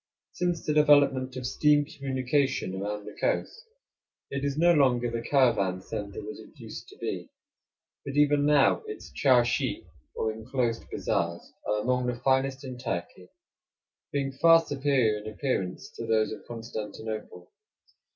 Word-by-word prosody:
Since 175 -2 -2
the 150 - +1
development 140 -3 +4
of 130 -1 -5
steam 145 +3 +3
communication 135 -5 -1
around 105 +2 -4
the - - -8
coast, 460 +2 -1 0.7
it 140 0 -3
is 140 0 -1
no 170 +2 +5
longer 125 -5 +3
the 115 0 -2
caravan 115 -9 +2
center 100 0 -6
that 105 +1 -7
it - - -24
used - - -9
to - - -15
be; - - -4 0.7
but 140 0 -6
even 145 0 +4
now 145 -2 +4
its 425 - -8
charshi, 125 -3 +2 0.3
or 110 - 0
inclosed 115 +1 -2
bazaars, 85 0 -2
are 105 0 +1
among 125 0 +1
the 125 - -1
finest 130 +2 +1
in 130 -1 -7
Turkey, 90 -5 -5 0.8
being 140 -1 -1
far 165 0 +8
superior 135 -6 +1
in 110 +1 -7
appearance 105 -7 -3
to 115 - -7
those 110 -1 +2
of 110 - -9
Constantinople. 110 -4 -6
130 Hz, 145 wpm, -28 LUFS, 110-140 Hz, 0.8 s, far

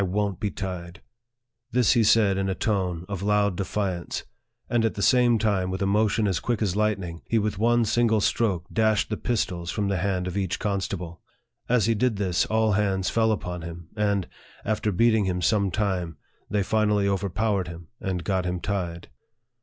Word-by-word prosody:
won't 100 0 -1
le 105 - +1
tied! 90 -2 -6 0.4
" 120 0 -56
This 125 -3 +4
he 120 -3 +4
said 105 -2 +4
in 95 0 -1
a 95 - -1
tone 90 -6 -1
of 100 -3 -4
loud 100 -1 +2
defiance; 95 -2 -3 0.4
and 120 -1 +1
at 115 - 0
the 100 - -2
same 125 -3 +4
time, 100 -4 0
with 95 0 -3
a 100 - 0
motion 105 +2 +2
as 95 -4 0
quick 120 -3 -1
as 95 -3 0
lightning, 95 -6 -1
he 115 - +1
with 105 -2 -1
one 120 +1 +3
'single 110 0 +2
stroke 100 -6 +1
dashed 110 -1 +2
the - - +1
pistols 90 -7 -2
from 100 0 -1
the 95 - 0
hand 95 0 -1
of 90 0 -4
each 95 -3 -1
constable. 95 -4 -3 0.5
As 120 -4 +3
he 115 - +3
did 115 +1 +1
this, 95 -4 0
all 110 0 +2
hands 95 -2 +1
fell 110 -1 +2
upon 90 -4 -3
him, 85 0 -8
and, 100 -3 0 0.4
after 110 0 0
beating 110 +2 +3
him 90 -1 -1
some 100 +1 +2
time, 90 -5 -2 0.3
they 100 0 +1
finally 105 -1 +2
over 100 0 0
powered 100 0 0
him, 85 -1 -9
and 90 -3 -3
got 95 -1 0
him 90 0 -2
tied. 90 -4 -3
100 Hz, 195 wpm, -25 LUFS, 90-110 Hz, 0.5 s, This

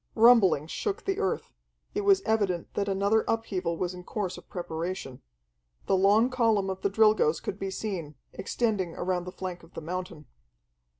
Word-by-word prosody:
Rumblings 210 - +5
shook 420 +1 -3
the 390 -1 -1
earth; 190 - -1 0.4
it - - -1
was 195 -1 +4
evident 200 -6 0
that 200 - -1
another 200 +3 +2
upheaval 190 -7 -1
was 180 +1 -2
in 180 0 -9
course 195 -1 -3
of - - -13
preparation. 170 -5 -5 0.6
The - - +2
long 205 +6 +4
column 225 -6 +2
of 190 0 -6
the 200 - +1
Drilgoes 215 -6 +4
could 195 - -5
be 195 - -3
seen, 185 -7 -4 0.2
extending 195 -3 -1
around 180 0 -1
the 180 - -6
flank 180 -1 -6
of 165 - -19
the - - -4
mountain. 180 -1 -5
190 Hz, 170 wpm, -28 LUFS, 175-215 Hz, 0.6 s, Rumblings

